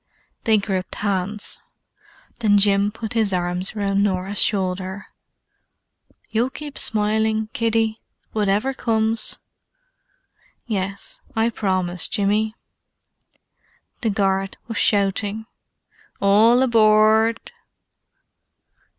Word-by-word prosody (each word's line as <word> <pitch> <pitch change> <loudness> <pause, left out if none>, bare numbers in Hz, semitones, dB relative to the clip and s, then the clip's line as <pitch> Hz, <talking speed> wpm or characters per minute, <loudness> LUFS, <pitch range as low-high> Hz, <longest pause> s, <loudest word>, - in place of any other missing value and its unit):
They 220 -1 +4
gripped 190 -3 -3
hands. 205 +1 -2 0.8
Then 210 -3 +4
Jim 200 0 +3
put 220 +1 -6
his 220 -3 +2
arms 180 +2 -2
round 200 -1 0
Norah's 195 0 0
shoulder. 190 0 -1 1.2
"You'll 235 +3 0
keep 295 +1 -8
smiling, 220 0 0
kiddie? 225 -1 0 0.3
Whatever 210 +5 0
comes?" 225 -2 0 1.3
"Yes, 195 -3 -4 0.2
I 225 +1 +1
promise, 185 -5 0
Jimmy." 215 +1 0 1.5
The 230 - +1
guard 195 -1 0
was 225 -4 -3
shouting. 205 +2 +1 0.7
"All 220 +5 +5
aboard." 220 - +3
210 Hz, 85 wpm, -21 LUFS, 195-220 Hz, 1.5 s, All